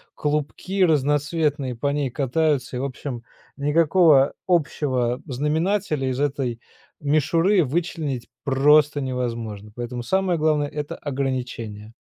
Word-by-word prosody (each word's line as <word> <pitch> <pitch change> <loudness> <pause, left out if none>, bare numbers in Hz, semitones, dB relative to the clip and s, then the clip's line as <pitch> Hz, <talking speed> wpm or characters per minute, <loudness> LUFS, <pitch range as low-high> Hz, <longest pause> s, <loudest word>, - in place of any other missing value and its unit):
клубки 150 +6 -1
разноцветные 150 -3 +1
по 140 - -1
ней 145 -2 -1
катаются, 140 0 0
и, - - -2
в - - -2
общем, 130 -2 -5 0.3
никакого 150 0 +4 0.2
общего 130 -7 +1
знаменателя 150 +2 0
из 130 0 -2
этой 135 -5 -1 0.4
мишуры 165 +6 +3
вычленить 150 -3 -2 0.2
просто 145 +2 +4
невозможно, 115 -5 -4
поэтому 120 +1 -5
самое 190 +5 +1
главное- 150 -2 +2
это 150 0 -5
ограничение. 125 -6 -4
145 Hz, 110 wpm, -23 LUFS, 125-155 Hz, 0.4 s, никакого